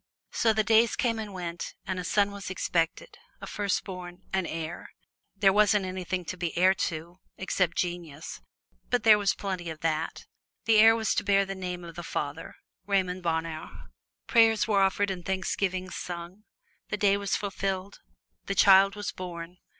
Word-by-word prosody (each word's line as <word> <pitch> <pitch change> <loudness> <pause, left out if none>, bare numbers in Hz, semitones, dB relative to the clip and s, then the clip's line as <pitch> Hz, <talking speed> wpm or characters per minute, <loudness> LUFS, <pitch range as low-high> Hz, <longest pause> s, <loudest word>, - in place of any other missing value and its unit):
So 225 - +3
the 220 0 +2
days 225 +1 +4
came 230 -2 0
and 215 -2 -5
went, 175 -2 -5
and 185 0 -3
a - - -3
son 200 +2 +2
was 200 -2 -7
expected 175 - -2 0.2
a - - -7
firstborn 185 -3 -4
an 190 -3 0
heir. 165 +1 -5 0.5
There 195 -1 +4
wasn't 210 -1 +4
anything 185 -1 -3
to 185 - -5
be 175 -2 -3
heir 185 +2 +5 0.2
to 170 +2 -8 0.2
except 185 -2 0
genius, 170 -4 -4 0.5
but 245 -3 +1
there 215 -2 +7
was 200 -1 +1
plenty 185 -4 -4
of 160 -1 -8
that. 160 0 -2 0.4
The 225 -1 +5
heir 225 +1 +8
was 220 -2 0
to - - 0
bear 200 0 +3
the 195 - -4
name 180 -2 -5
of 170 -1 -9
the 175 - -7
father 150 -2 -4 0.3
Raymond 185 -2 0
Bonheur. 160 -2 -4 0.3
Prayers 225 -2 +4
were 205 -3 +3
offered 195 +1 +2
and 180 -2 -5
thanksgivings 185 0 -2
sung. 175 +4 -7 0.4
The 210 - -2
days 200 -1 +3
were 200 - -6
fulfilled. 195 -1 -2 0.5
The 195 - -1
child 195 +1 +6
was 205 -2 -4
born. 175 -1 -8
190 Hz, 170 wpm, -28 LUFS, 175-205 Hz, 0.5 s, heir